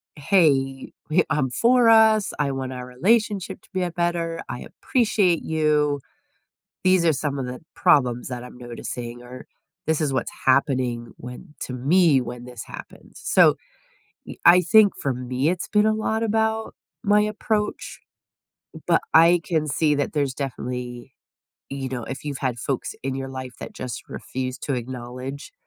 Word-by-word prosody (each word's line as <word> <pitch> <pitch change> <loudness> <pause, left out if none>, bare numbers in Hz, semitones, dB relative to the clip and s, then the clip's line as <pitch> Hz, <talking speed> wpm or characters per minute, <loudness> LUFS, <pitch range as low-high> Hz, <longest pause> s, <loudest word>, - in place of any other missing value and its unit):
"Hey, 140 -5 +2 0.2
wi 170 +3 +4
I'm 150 -4 +1
for 240 - +4
us, 220 -2 +5
I 145 -2 +1
want 130 -1 -4
our 125 0 -6
relationship 200 - 0
to - - -24
be 185 -1 0
a 175 - -2
better, 170 -1 -1
I - - -4
appreciate 205 - +1
you. 150 -2 +1 0.9
These 185 -2 +4
are 160 - +5
some 140 0 -2
of 130 - -3
the 125 0 -6
problems 125 -4 +2
that 125 -1 -6
I'm 125 - -12
noticing, 120 0 -7
or 125 +1 -11 0.4
this 160 0 +1
is 145 -3 0
what's 130 - -2
happening 125 -3 +1
when 125 +4 -10
to 125 - -5
me 145 +2 +3
when 120 0 -7
this 125 -2 -9
happens." - - -12
So, - - +5 0.7
y - - -8
I 180 +1 +8
think 205 +3 +5
for 135 - 0
me, 125 +4 -1
it's 180 -1 -2
been 210 0 +3
a 215 - +3
lot 220 +1 -1
about 220 0 0 0.3
my 210 -1 +4
approach, 210 0 -2 0.9
but - - +4
I 170 +1 +7
can 160 -2 0
see 150 +1 +2
that 145 - -2
there's 140 -4 0
definitely, 125 -2 -5 0.6
you 135 -1 -4
know, 125 -3 -4
if 135 +5 -7
you've 145 -2 -4
had 125 -3 -2
folks 135 -1 -3
in 135 0 -2
your 135 0 -4
life 130 -1 -7
that - - -7
just 125 -2 -6
refuse 130 0 -5
to 140 - -2
acknowledge 125 +3 -6
140 Hz, 165 wpm, -23 LUFS, 125-180 Hz, 0.9 s, I